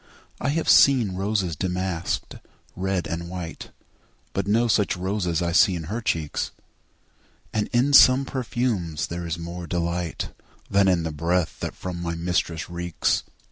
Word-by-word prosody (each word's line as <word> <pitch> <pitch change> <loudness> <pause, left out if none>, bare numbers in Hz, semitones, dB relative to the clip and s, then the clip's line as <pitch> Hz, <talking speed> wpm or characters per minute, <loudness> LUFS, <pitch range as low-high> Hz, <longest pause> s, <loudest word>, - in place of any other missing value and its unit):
I - - -1
have 160 +3 -1
seen 125 -8 +6
roses 95 -3 -1
damask'd, 90 0 -2 0.4
red 95 -1 -1
and 85 +1 -4
white, 90 -3 -6 0.6
But 100 0 -2
no 115 +4 +3
such 105 -4 +2
roses 90 -2 -1
see 95 +1 +6
I - - -2
in 80 - -6
her 105 +9 -4
cheeks; 80 -9 -1 1.0
And 105 -1 0
in 125 +4 +2
some 135 0 +8
perfumes 115 - -2
is 85 - 0
there 85 0 -4
more 85 +1 -6
delight 85 0 -2 0.4
Than 100 0 +4
in 90 -3 +3
the 80 - -2
breath 85 +2 -1
that - - -4
from 90 -2 -5
my 85 -1 -2
mistress 85 -1 -1
reeks. 85 -1 -1
90 Hz, 150 wpm, -24 LUFS, 85-105 Hz, 1.0 s, some